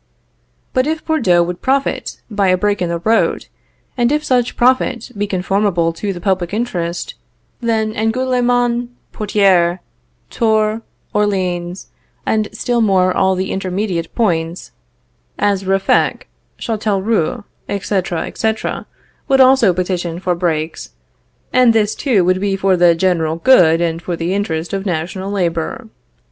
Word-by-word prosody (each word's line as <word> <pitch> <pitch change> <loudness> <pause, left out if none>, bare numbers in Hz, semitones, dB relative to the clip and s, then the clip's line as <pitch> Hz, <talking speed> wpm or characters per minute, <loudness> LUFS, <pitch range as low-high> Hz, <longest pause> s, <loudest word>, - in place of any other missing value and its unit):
But 255 +2 +1
if 315 0 -2
Bordeaux 200 - +3
would 175 +1 -5
profit 270 +1 -1
by 205 -3 0
a 185 0 +3
break 205 +1 0
in 175 - 0
the 170 - -1
road, 220 +7 +1 0.5
and 240 0 +1
if 300 0 +1
such 250 -4 0
profit 245 -1 +1
be 205 0 -2
conformable 190 -3 0
to 200 +4 -3
the 180 - -6
public 185 0 -1
interest, 180 -8 -3 0.5
then 220 -2 0
Angoulème, 245 +1 +1 0.3
Poictiers, 195 -5 +2 0.5
Tours, 220 -1 +1 0.3
Orleans, 185 -3 -1 0.3
and 215 -1 +1
still 235 +2 -1
more 185 -4 +3
all 190 0 +2
the 185 +1 -2
intermediate 185 -2 -3
points, 170 -6 -1 0.7
as 200 -2 0
Ruffec, 195 0 +1 0.3
Châtellerault, 215 -1 -1 0.3
etc., 190 -4 -1
etc., 220 0 -3 0.4
would 270 0 +3
also 260 -6 +6
petition 175 -1 -2
for 185 -1 0
breaks; 165 -2 -3 0.6
and 250 -2 +5
this 215 -1 +2
too 225 -11 +1
would 185 +1 +1
be 200 -1 0
for 195 -1 +2
the 175 -1 +4
general 165 -3 +1
good 170 -5 +5
and 165 -1 -1
for 175 0 -3
the 170 +2 -2
interest 170 -4 -2
of 195 -1 -2
national 185 +1 -3
labor. 175 0 -2
195 Hz, 135 wpm, -17 LUFS, 175-225 Hz, 0.7 s, also